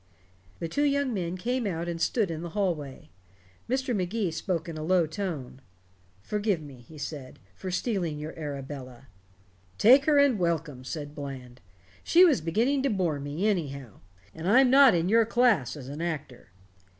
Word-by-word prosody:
The 165 - -4
two 285 - -2
young 280 -3 +1
men 180 -3 -3
came 245 +3 -1
out 170 -2 -3
and 170 -1 -4
stood 210 -4 +1
in 160 -1 -5
the 170 - -5
hallway. 150 - -3 0.6
Mr. 260 -1 0
Magee 190 0 -1
spoke 170 +1 -3
in 165 - -6
a 155 - -5
low 175 +1 +3
tone. 155 -7 -5 0.6
"Forgive 210 - -1
me," 145 -4 -11
he 155 - -13
said, 140 -2 -7 0.2
"for 185 - -7
stealing 180 -5 -2
your 150 +1 -6
Arabella." 135 -4 -7 0.7
"Take 260 +6 +6
her 300 -2 +4
and 280 -6 +4
welcome," 165 -6 -2
said 145 +2 -6
Bland. 130 -4 -8 0.4
"She 355 +2 +6
was 295 - +3
beginning 230 - +1
to 275 - +1
bore 175 -8 0
me, 145 +8 -2
anyhow. 140 - -3 0.3
And 160 +2 -6
I'm 250 +3 +5
not 270 -5 +7
in 170 +1 +1
your 225 +3 +5
class 230 - +2
as 130 -3 -9
an 145 +4 -6
actor." 150 - -5
170 Hz, 170 wpm, -27 LUFS, 145-220 Hz, 0.7 s, not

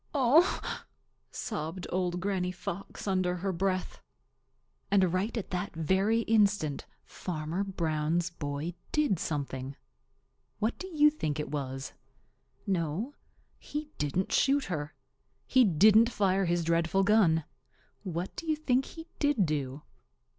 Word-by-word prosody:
"Oh!" 285 +7 +3 0.5
sobbed 175 -3 -4
Old 180 -1 0
Granny 185 -1 -1
Fox 185 +2 -6
under 185 -2 +1
her 190 +2 -2
breath. 185 +1 -1 0.9
And 190 -3 +3
right 200 +6 -1
at 220 - -4
that 180 +1 -3
very 190 +8 +2
instant 205 -10 +2 0.2
Farmer 165 +2 -3
Brown's 170 -2 -1
boy 145 +1 -4 0.2
did 295 - +2
something. 135 -4 -3 0.8
What 220 +3 -1
do 375 - -5
you 300 -4 +5
think 155 - -3
it 150 - -4
was? 135 -2 -4 0.7
No, 185 - -1 0.5
he 300 0 -5
didn't 150 +6 -1
shoot 275 0 +3
her. 150 -5 -4 0.5
He 260 -1 +5
didn't 215 +5 +6
fire 195 -4 +1
his 170 0 +1
dreadful 170 +3 +2
gun. 190 -6 +4 0.6
What 180 -2 -4
do 335 - -7
you 310 - +2
think 265 -4 +1
he 325 -1 -10
did 290 -9 +3
do? 145 -2 -3
185 Hz, 125 wpm, -30 LUFS, 160-220 Hz, 0.9 s, didn't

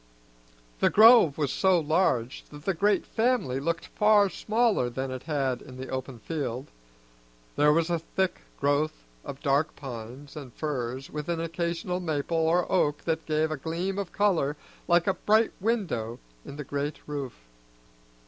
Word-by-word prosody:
The - - +4
grove 220 - +7
was 145 -4 0
so 190 -2 +3
large 150 -6 0
that 145 0 -12
the 195 - +1
great 200 +2 +2
family 225 - 0
looked 165 +3 -2
far 210 -2 +3
smaller 220 - +1
than 130 +2 -4
it 130 -1 -5
had 135 -4 0
in 130 - -11
the 130 +1 -7
open 130 -1 -5
field; 135 0 -4 0.8
there 150 +1 +5
was 165 +2 +2
a 170 - +1
thick 185 +3 -2 0.2
growth 145 - 0 0.2
of 135 - -8
dark 140 +2 +1
pines 130 +1 -8
and 140 -5 -8
firs 130 -3 -4
with 150 +2 -5
an 170 -1 -1
occasional 170 +2 -2
maple 160 -2 -2
or 165 +2 +2
oak 150 -6 +1
that 160 -1 -2
gave 155 0 +1
a 155 - -2
gleam 170 +7 -3
of 195 -4 -4
color 165 -8 +1 0.3
like 175 0 +4
a 195 - +2
bright 220 +3 +2
window 180 - -1 0.3
in - - -9
the 150 - -5
great 145 +2 -3
roof. 140 -4 -5
155 Hz, 160 wpm, -27 LUFS, 135-180 Hz, 0.8 s, grove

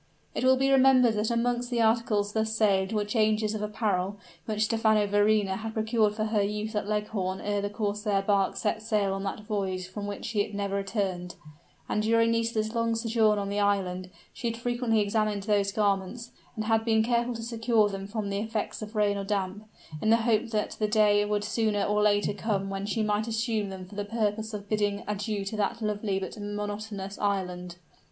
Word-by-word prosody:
It - - -2
will 260 0 +5
be 270 +1 +2
remembered 260 -3 +6
that 210 +1 0
amongst 240 +1 0
the 240 -2 -1
articles 220 -2 +2
thus 220 0 0
saved 195 -2 +2
were 210 -2 0
changes 215 0 +1
of 215 - -3
apparel, 205 -2 -1 0.3
which 215 -1 0
Stephano 220 -1 +3
Verrina 205 -1 +2
had 225 0 -6
procured 220 -1 +1
for 215 - -1
her 215 -1 +1
use 210 +2 -2
at 210 -1 -2
Leghorn 205 -3 -1
ere 205 -1 -1
the 205 - -2
corsair 205 -1 -1
bark 195 -1 +2
set 210 +3 -1
sail 210 -3 +1
on 195 - -3
that 195 - -3
voyage 195 -4 -2
from 205 +2 -6
which 205 +2 -5
it 205 0 0
never 200 -1 -2
returned, 195 -3 -2 0.5
and 210 - 0
during 230 +1 +3
Nisida's 230 -1 0
long 230 -1 +1
sojourn 225 -2 +2
on 200 -1 -2
the 205 +1 -1
island, 185 -3 0 0.2
she 235 - -4
had 230 - -4
frequently 240 -2 +1
examined 210 -1 0
those 200 -1 +1
garments, 205 +3 -1 0.2
and 215 -2 -3
had 225 0 +2
been 220 -1 +3
careful 235 +1 +1
to 230 - -6
secure 225 -2 +2
them 195 -1 -5
from 205 -1 -3
the 200 - -1
effects 220 0 -3
of 215 +1 -7
rain 205 -1 +2
or 200 - -3
damp, 195 +1 -2 0.4
in 220 - +1
the 225 - +6
hope 230 0 +2
that 215 -2 -1
the 215 - +2
day 210 -1 +4
would 205 0 -1
sooner 210 -1 0
or 210 0 +1
later 205 -1 +3
come 200 -2 -2
when 195 +1 -3
she 220 +1 0
might 210 +1 0
assume 220 -2 -1
them 190 -1 -7
for 185 - -15
the 205 0 -3
purpose 215 0 -1
of 205 -1 -6
bidding 205 -1 0
adieu 205 0 -2
to 200 - -4
that 210 +2 -1
lovely 210 -2 -1
but 195 +2 -5
monotonous 205 -1 -5
island. 180 -3 -2
210 Hz, 200 wpm, -28 LUFS, 200-220 Hz, 0.5 s, remembered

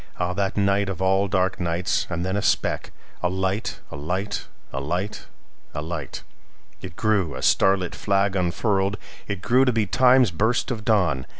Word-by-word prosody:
Ah, 90 0 -1
that 100 +1 -1
nightOf 100 -2 +1
all 95 +1 +2
dark 95 -1 0
nights! 85 +1 0
And 85 0 -2
then 95 +1 -1
a 105 - 0
speck—A 90 - -2
light! 95 +3 -2
A - - -6
light! 95 +8 -3 0.3
A 70 - -2
light! 90 +8 -3 0.5
A 75 - -2
light! 85 0 -5 0.6
It 90 -3 -8
grew, 100 - +1
a 65 - -6
starlit 95 -2 +3
flag 100 -1 +1
unfurled! 95 +2 0 0.3
It 100 -4 -4
grew 125 +2 +4
to 130 - +3
be 115 -3 +1
Time's 125 0 +4
burst 110 +10 0
of 110 -3 -4
dawn. 90 - +1
95 Hz, 165 wpm, -24 LUFS, 90-105 Hz, 0.6 s, grew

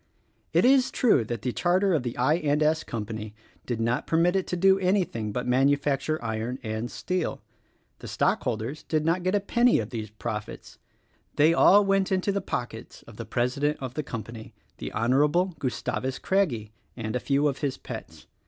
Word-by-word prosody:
It - - +3
is 265 0 +5
true 215 - +3
that 115 -1 -5
the 125 - 0
charter 185 +6 +2
of 155 - +2
the 120 -1 -5
I. 130 +6 +3
& 175 - -8
S. 155 +2 +2
Co. 110 -3 -4 0.6
did 120 -2 -2
not 115 +2 -1
per 160 - +1
mit 175 +3 +3
it 190 - 0
to 180 - -2
do 190 +2 +4
anything 180 - 0
but 125 +4 -3
manufacture 140 +3 +1
iron 115 +3 -3
and 110 +1 -3
steel; 180 -2 -3 0.6
the - - -9
stockholders 120 +8 -1
did 155 -1 -1
not 170 +3 +1
get 185 +3 0
a - - +3
penny 240 +4 +3
of 110 +1 -3
these 110 -3 -5
profits 105 0 -7 0.3
— - - -40
they 155 +3 +5
all 200 +4 +6
went 195 -1 +1
into 190 +1 +1
the 200 0 -1
pockets 115 -2 -6
of 115 -2 -14
the 115 - -6
president 125 +6 0
of 130 -2 -5
the 155 - -2
company, 115 -4 -8 0.2
the - - -5
Honorable 150 - +2
Gustavus 130 0 -2
Craggie, 135 - 0 0.3
and 110 -1 -4
a - - +1
few 140 +3 +1
of 135 -2 -2
his 140 -3 -2
pets. - - -9
140 Hz, 190 wpm, -26 LUFS, 115-180 Hz, 0.6 s, all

